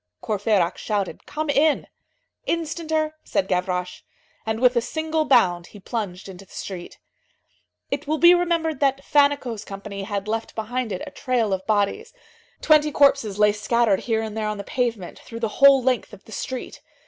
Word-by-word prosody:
Courfeyrac 205 Hz, -4 st, +1 dB
shouted:—"Come 220 Hz, -, -3 dB
in!" 295 Hz, +1 st, +2 dB, 0.6 s
"Instanter," 320 Hz, -1 st, -1 dB
said 190 Hz, -, -1 dB
Gavroche. 180 Hz, -1 st, -2 dB, 0.5 s
And 220 Hz, 0 st, -1 dB
with 250 Hz, 0 st, +4 dB
a 235 Hz, -, +3 dB
single 315 Hz, +5 st, -1 dB
bound 180 Hz, -11 st, +3 dB
he 205 Hz, -, -13 dB
plunged 200 Hz, -3 st, -5 dB
into 190 Hz, 0 st, -10 dB
the 195 Hz, -, -23 dB
street. 180 Hz, -3 st, -7 dB, 0.9 s
It -, -, -3 dB
will 310 Hz, +1 st, 0 dB
be 345 Hz, +2 st, +8 dB
remembered 335 Hz, -4 st, 0 dB
that 275 Hz, -1 st, +1 dB
Fannicot's 285 Hz, -6 st, +2 dB
company 200 Hz, 0 st, -7 dB
had 200 Hz, 0 st, -4 dB
left 225 Hz, +1 st, -3 dB
behind 230 Hz, +1 st, -3 dB
it 185 Hz, -, -4 dB
a -, -, -9 dB
trail 240 Hz, -6 st, 0 dB
of 190 Hz, 0 st, -4 dB
bodies. 215 Hz, -, 0 dB, 0.5 s
Twenty 305 Hz, -1 st, +4 dB
corpses 275 Hz, -8 st, +3 dB
lay 210 Hz, 0 st, +5 dB
scattered 210 Hz, 0 st, +1 dB
here 225 Hz, -2 st, -1 dB
and 220 Hz, -1 st, -6 dB
there 215 Hz, -1 st, -2 dB
on 215 Hz, 0 st, -3 dB
the 200 Hz, -, -5 dB
pavement, 230 Hz, -6 st, -3 dB
through 230 Hz, 0 st, -9 dB
the 225 Hz, -, 0 dB
whole 275 Hz, -2 st, +8 dB
length 250 Hz, -3 st, 0 dB
of 205 Hz, -, -13 dB
the -, -, -15 dB
street. 255 Hz, +3 st, -6 dB
225 Hz, 170 wpm, -23 LUFS, 200-285 Hz, 0.9 s, be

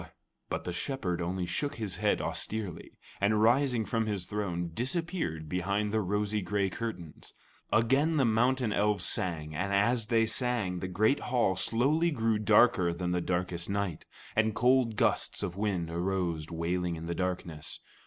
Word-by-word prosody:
But -, -, -3 dB
the 90 Hz, -, -4 dB
Shepherd 90 Hz, -4 st, -2 dB
only 90 Hz, +1 st, -2 dB
shook 145 Hz, -, -2 dB
his 105 Hz, -5 st, -4 dB
head -, -, +1 dB
austerely, 105 Hz, -6 st, -4 dB, 0.2 s
and 105 Hz, +2 st, +3 dB
rising 120 Hz, +1 st, +3 dB
from 110 Hz, +3 st, -1 dB
his 100 Hz, -4 st, -2 dB
throne, 90 Hz, -5 st, -3 dB
disappeared 130 Hz, -, -2 dB
behind 100 Hz, +5 st, -1 dB
the 110 Hz, -, +2 dB
rose 105 Hz, +2 st, -1 dB
gray 100 Hz, +1 st, 0 dB
curtains. 90 Hz, -10 st, -6 dB, 0.4 s
Again 135 Hz, +9 st, +3 dB
the 135 Hz, -, +4 dB
mountain 120 Hz, +1 st, +2 dB
elves 105 Hz, 0 st, +1 dB
sang, 80 Hz, -7 st, -1 dB
and 95 Hz, +5 st, -2 dB
as 105 Hz, +3 st, +2 dB
they 115 Hz, -1 st, +3 dB
sang, 110 Hz, -5 st, -1 dB
the 95 Hz, -, -3 dB
great 110 Hz, +9 st, +2 dB
hall 120 Hz, -7 st, +1 dB
slowly 135 Hz, -, +2 dB
grew 115 Hz, -7 st, +1 dB
darker 105 Hz, -4 st, +4 dB
than 90 Hz, +1 st, -3 dB
the 90 Hz, 0 st, 0 dB
darkest 90 Hz, 0 st, -2 dB
night, 100 Hz, -5 st, -2 dB, 0.3 s
and 110 Hz, -1 st, +2 dB
cold 125 Hz, -2 st, +3 dB
gusts -, -, +1 dB
of 90 Hz, -, -3 dB
wind 95 Hz, -5 st, -1 dB
arose 85 Hz, -3 st, -1 dB
wailing 85 Hz, +1 st, -1 dB
in 80 Hz, 0 st, -7 dB
the 85 Hz, -, -2 dB
darkness. 90 Hz, -4 st, -3 dB
100 Hz, 160 wpm, -30 LUFS, 90-115 Hz, 0.4 s, the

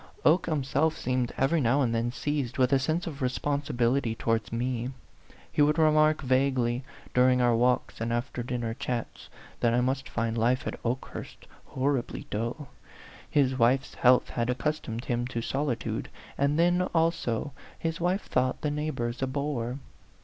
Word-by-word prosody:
Oke 165 Hz, +4 st, +4 dB
himself 150 Hz, +2 st, +1 dB
seemed 125 Hz, -1 st, -1 dB
every 145 Hz, +4 st, +2 dB
now 135 Hz, +3 st, +3 dB
and 115 Hz, -2 st, 0 dB
then 115 Hz, +1 st, 0 dB
seized 140 Hz, -2 st, -2 dB
with 130 Hz, +1 st, +3 dB
a 135 Hz, -, +5 dB
sense 155 Hz, +6 st, -1 dB
of 150 Hz, -4 st, -6 dB
responsibility 130 Hz, -2 st, 0 dB
towards 115 Hz, -1 st, -1 dB
me. 120 Hz, +1 st, -1 dB, 0.6 s
He -, -, +1 dB
would 150 Hz, +1 st, +4 dB
remark 155 Hz, -1 st, +4 dB
vaguely, 130 Hz, -2 st, +1 dB, 0.3 s
during 125 Hz, 0 st, +4 dB
our 120 Hz, -1 st, +4 dB
walks 125 Hz, 0 st, +1 dB
and 115 Hz, +1 st, -1 dB
after 120 Hz, +1 st, -2 dB
dinner 120 Hz, -2 st, -3 dB
chats, 120 Hz, 0 st, -4 dB, 0.3 s
that 120 Hz, 0 st, +2 dB
I 125 Hz, -, +3 dB
must 130 Hz, +2 st, -1 dB
find 115 Hz, -1 st, -1 dB
life 120 Hz, +3 st, +1 dB
at -, -, -5 dB
Okehurst 125 Hz, +2 st, -5 dB, 0.2 s
horribly 135 Hz, -1 st, -1 dB
dull; 120 Hz, +6 st, -3 dB, 0.6 s
his 135 Hz, -2 st, +2 dB
wife's 130 Hz, +3 st, +3 dB
health 125 Hz, 0 st, +4 dB
had 120 Hz, 0 st, -1 dB
accustomed 125 Hz, -2 st, -2 dB
him 120 Hz, 0 st, -1 dB
to 125 Hz, -2 st, -3 dB
solitude, 135 Hz, -3 st, -2 dB, 0.3 s
and 140 Hz, +2 st, +1 dB
then, 175 Hz, +2 st, +3 dB
also, 160 Hz, -6 st, +1 dB, 0.3 s
his 165 Hz, 0 st, -3 dB
wife 180 Hz, +4 st, +1 dB
thought 130 Hz, 0 st, 0 dB
the 150 Hz, -, 0 dB
neighbors 145 Hz, -6 st, -3 dB
a 135 Hz, -, +1 dB
bore. 130 Hz, -3 st, -2 dB
130 Hz, 155 wpm, -28 LUFS, 120-145 Hz, 0.6 s, a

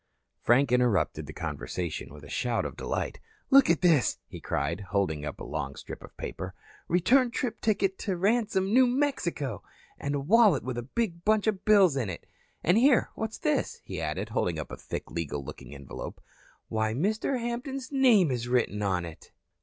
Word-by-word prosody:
Frank 125 Hz, +2 st, +4 dB
interrupted 125 Hz, -6 st, +2 dB
the -, -, -6 dB
conversation 85 Hz, -6 st, -4 dB
with 75 Hz, 0 st, -12 dB
a -, -, -10 dB
shout 120 Hz, +9 st, -1 dB
of -, -, -5 dB
delight. -, -, -3 dB, 0.3 s
"Look 275 Hz, 0 st, +7 dB
at 165 Hz, -4 st, +3 dB
this," 160 Hz, -9 st, +4 dB
he -, -, -10 dB
cried, 75 Hz, +5 st, -1 dB
holding 90 Hz, -7 st, 0 dB
up 75 Hz, -, -5 dB
a -, -, -6 dB
long 70 Hz, -3 st, -4 dB
strip -, -, -9 dB
of -, -, -14 dB
paper. 95 Hz, -1 st, -6 dB, 0.3 s
"Return 245 Hz, +9 st, +4 dB
trip 245 Hz, -1 st, -3 dB
ticket 195 Hz, -3 st, +1 dB
to 190 Hz, -4 st, -2 dB
Ransome, 205 Hz, 0 st, +1 dB
New 255 Hz, +1 st, +6 dB
Mexico. 245 Hz, -, -1 dB, 0.4 s
And 140 Hz, 0 st, -2 dB
a -, -, 0 dB
wallet 195 Hz, -, +4 dB
with 125 Hz, -1 st, -3 dB
a 120 Hz, +3 st, -10 dB
big 180 Hz, -8 st, -1 dB
bunch 215 Hz, -1 st, +3 dB
of 210 Hz, -4 st, -1 dB
bills 195 Hz, -8 st, +6 dB
in 120 Hz, -7 st, -1 dB
it. 90 Hz, -, -7 dB, 0.4 s
And 180 Hz, +6 st, +4 dB
here, 260 Hz, 0 st, +4 dB
what's 220 Hz, 0 st, -4 dB
this?" -, -, -1 dB
he -, -, -5 dB
added, -, -, -3 dB
holding 85 Hz, -2 st, 0 dB
up 75 Hz, -, -6 dB
a -, -, -4 dB
thick, -, -, -6 dB
legal 75 Hz, -4 st, -3 dB
looking 70 Hz, -, -9 dB
envelope. 70 Hz, -1 st, -8 dB, 0.5 s
"Why, 110 Hz, 0 st, -1 dB
Mr. 215 Hz, -, 0 dB
Hampton's 250 Hz, +3 st, -4 dB
name 240 Hz, -, +5 dB
is 120 Hz, -1 st, -2 dB
written 120 Hz, -4 st, +1 dB
on 95 Hz, -4 st, 0 dB
it." 80 Hz, -1 st, -11 dB
160 Hz, 185 wpm, -28 LUFS, -, 0.5 s, Look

